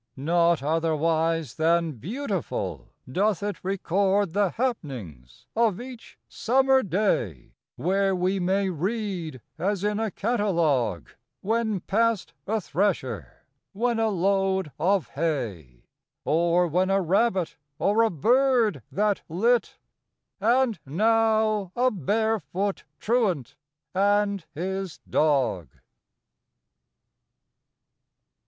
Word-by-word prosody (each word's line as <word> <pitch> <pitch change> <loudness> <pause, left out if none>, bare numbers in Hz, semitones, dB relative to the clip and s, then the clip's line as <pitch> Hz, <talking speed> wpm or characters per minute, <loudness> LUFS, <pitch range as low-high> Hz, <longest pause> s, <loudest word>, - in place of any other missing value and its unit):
Not 170 +2 +2
otherwise 160 -1 0
than 165 +1 +2
beautiful, 160 - -4 0.2
doth 195 +7 0
it 205 0 -2
Record 195 0 +1
the 200 -1 +2
happ'nings 125 - -5
of 220 -4 +2
each 245 -1 -10
summer 265 +2 +3
day; 170 - -1 0.2
Where 190 +6 +1
we 185 +2 0
may 190 +2 +1
read, 180 - -3 0.2
as 195 +2 -1
in 210 0 0
a 220 -1 0
catalogue, 170 - 0 0.3
When 220 -2 0
passed 225 +1 0
a 220 +2 +1
thresher; 200 +2 -2 0.3
when 235 +3 0
a 225 -1 +2
load 190 -2 +1
of 185 - +1
hay; 105 - -3 0.4
Or 170 +3 +3
when 180 +4 +1
a 195 0 +3
rabbit; 190 0 +1 0.2
or 205 +6 +2
a 225 - +4
bird 240 - +2
that 205 0 +1
lit; 230 +9 +1 0.6
And 235 0 +2
now 215 +3 +2
a 255 +1 +3
bare 220 +5 0
foot 195 +1 -3
truant 210 - 0 0.4
and 200 0 +2
his 190 +1 -4
dog. 130 - +1
195 Hz, 100 wpm, -26 LUFS, 165-215 Hz, 0.6 s, a